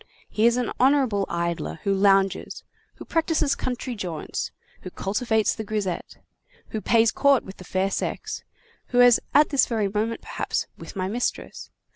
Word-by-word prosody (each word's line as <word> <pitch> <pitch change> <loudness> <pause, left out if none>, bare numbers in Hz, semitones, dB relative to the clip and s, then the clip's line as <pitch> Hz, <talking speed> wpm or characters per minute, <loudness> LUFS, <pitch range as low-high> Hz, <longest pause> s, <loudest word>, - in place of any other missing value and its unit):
He 220 +2 +3
is 235 +1 +3
an 250 -2 -1
honorable 255 -7 +3
idler 170 -1 -2
who 200 - +1
lounges, 195 -1 +2 0.3
who - - -10
practises 320 -3 +1
country 255 -2 -3
jaunts, 180 -8 -4 0.3
who - - -7
cultivates 215 +4 0
the 220 - -5
grisette, 205 -4 -3 0.5
who 220 - -4
pays 230 0 +4
court 280 -3 +3
to 190 - -8
the - - -12
fair 190 +2 -1
sex, 435 - -3 0.4
who 245 - +1
is 245 -1 +7
at 295 +1 +6
this 280 -3 +3
very 220 -4 0
moment, 215 +3 -2
perhaps, - - -2
with - - -11
my 185 -1 -2
mistress. 240 +5 -3
220 Hz, 160 wpm, -24 LUFS, 195-245 Hz, 0.5 s, is